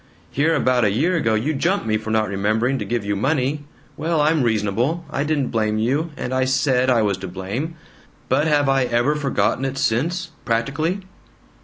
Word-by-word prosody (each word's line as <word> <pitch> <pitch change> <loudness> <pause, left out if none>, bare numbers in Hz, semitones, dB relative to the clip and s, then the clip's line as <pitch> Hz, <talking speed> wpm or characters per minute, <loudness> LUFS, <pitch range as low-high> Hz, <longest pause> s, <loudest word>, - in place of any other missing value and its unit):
Here 160 +4 +2
about 130 -4 +2
a 105 - +4
year 155 - +1
ago 115 -10 +1
you 130 +9 0
jump 170 - 0
me 110 -1 +1
for 110 0 -3
not 110 -1 +1
remembering 110 +7 0
to - - -3
give 120 -3 -2
you 100 0 0
money. 140 +5 0 0.3
Well, 160 +1 -1
I'm 155 +1 +3
reasonable. 115 - 0
I 140 - -1
didn't 145 -3 0
blame 110 -2 0
you, 135 +9 0
and 125 - -4
I 130 0 +2
SAID 130 -1 +2
I 120 -3 +3
was 100 -3 0
to 95 - -6
blame. 100 - -4 0.5
But 145 +5 +2
have 145 -2 +2
I 135 -1 +3
ever 120 +4 +1
forgotten 135 -5 0
it 135 0 -2
since 165 +10 0
practically?" 145 +11 -1
130 Hz, 190 wpm, -21 LUFS, 110-150 Hz, 0.5 s, a